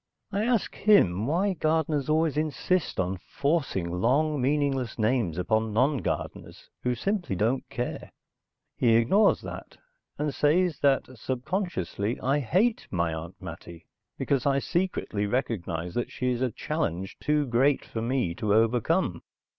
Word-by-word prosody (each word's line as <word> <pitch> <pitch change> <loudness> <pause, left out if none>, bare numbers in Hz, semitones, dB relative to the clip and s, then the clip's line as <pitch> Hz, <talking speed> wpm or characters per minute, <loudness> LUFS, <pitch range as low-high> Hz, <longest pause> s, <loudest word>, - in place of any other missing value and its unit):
I 205 +2 0
ask 240 -4 +1
him 110 - +3
why 185 +6 +1
gardeners 155 -3 0
always 155 -1 +2
insist 155 - 0
on 95 +1 0
forcing 140 - -1
long 135 - +1
meaningless 135 -3 0
names 110 -7 +1
upon 110 +4 0
non 130 +5 +2
gardeners - - -5
who 125 0 0
simply 185 - -1
don't 115 +8 0
care. 120 0 -4 0.6
He 115 -3 +3
ignores 195 - +4
that, - - -9 0.4
and 150 -1 -1
says 160 +1 +2
that 140 -2 +3
subconsciously 125 - -2
I 135 +3 +1
hate 190 - +1
my 85 -3 0
Aunt 85 +4 -7
Mattie 85 -3 -9 0.3
because 140 -1 0
I 140 -1 +3
secretly 140 - -1
recognize 90 -8 -2
that 120 - -2
she 125 0 -1
is 125 0 -2
a 130 - +2
challenge 95 - -3
too 150 -1 +1
great 130 +3 +2
for 110 - -5
me 120 -7 0
to 105 +3 0
overcome. 115 - +2
130 Hz, 140 wpm, -27 LUFS, 105-155 Hz, 0.6 s, ignores